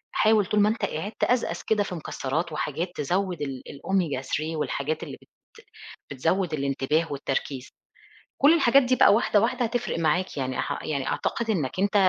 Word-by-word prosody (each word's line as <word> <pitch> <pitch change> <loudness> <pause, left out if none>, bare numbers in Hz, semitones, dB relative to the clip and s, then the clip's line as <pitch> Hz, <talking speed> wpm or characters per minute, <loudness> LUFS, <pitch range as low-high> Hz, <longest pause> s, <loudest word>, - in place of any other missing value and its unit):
حاول 215 -1 +4
طول 210 +3 +1
ما 205 +1 +5
أنت 220 -2 -1
قاعد 190 +5 -4
تقزقز 250 -1 0
كده 210 -2 +2
في 185 - -5
مكسرات 160 +1 -3
وحاجات 155 +3 -3
تزود 180 +4 -1
ال 135 -3 -4
الأوميجا 155 -2 -1
3 155 +4 -3
والحاجات 150 0 -2
اللي - - -8
بت - - -21 0.9
بتزود 175 +5 0
الانتباه 140 +3 0
والتركيز. 135 -1 -3 0.7
كل 285 +3 +7
الحاجات 275 -4 +5
دي 255 +1 +2
بقى 200 - +6
واحدة 210 -1 +3
واحدة 245 +2 +1
هتفرق 240 -6 -2
معاك 165 +2 0
يعني 130 -1 -2
ح - - -3
يعني 140 -3 -2
أعتقد 235 -1 -2
إنّك 165 -6 -1
أنت 200 +1 +1
170 Hz, 170 wpm, -26 LUFS, 145-210 Hz, 0.9 s, كل